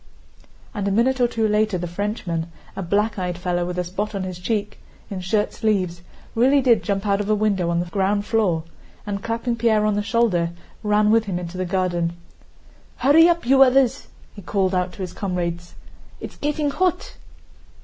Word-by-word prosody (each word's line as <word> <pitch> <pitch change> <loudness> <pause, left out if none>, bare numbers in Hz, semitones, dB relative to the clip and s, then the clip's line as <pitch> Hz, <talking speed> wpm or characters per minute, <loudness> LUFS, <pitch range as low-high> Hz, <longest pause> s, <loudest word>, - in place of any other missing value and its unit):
And 205 -2 -2
a - - +1
minute 250 +5 +2
or 245 - +5
two 225 -2 0
later 210 -2 +1
the 175 - -4
Frenchman, 175 -3 -3 0.2
a - - -4
black 205 +4 0
eyed 180 -1 -2
fellow 175 -1 -1
with 180 0 -4
a 180 - 0
spot 200 +4 -4
on 195 - -2
his 185 -1 -6
cheek, 210 +2 -2 0.3
in 190 -2 -4
shirt 205 +3 0
sleeves, 185 -6 -1 0.3
really 265 +5 +4
did 245 -4 +4
jump 200 -1 -2
out 200 0 +1
of 205 - -4
a 215 - +4
window 200 -5 +1
on 170 0 +1
the 175 - -1
ground 200 +3 0
floor, 200 -8 +1 0.4
and 200 -1 -3
clapping 230 +2 -2
Pierre 220 -2 +2
on 215 - +2
the 205 - 0
shoulder 205 -7 +1 0.3
ran 210 0 +3
with 225 0 +3
him 190 -3 -2
into 175 0 -6
the 185 0 -2
garden. 175 -2 0 0.8
"Hurry 320 +5 +6
up, 340 -4 0
you 270 +2 +5
others!" 265 0 +4 0.3
he 200 - -10
called 190 0 0
out 180 0 0
to 195 - -6
his 180 - -6
comrades. 175 -3 -3 0.4
"It's - - -8
getting 295 0 -1
hot." 360 +3 -1
205 Hz, 190 wpm, -22 LUFS, 180-225 Hz, 0.8 s, Hurry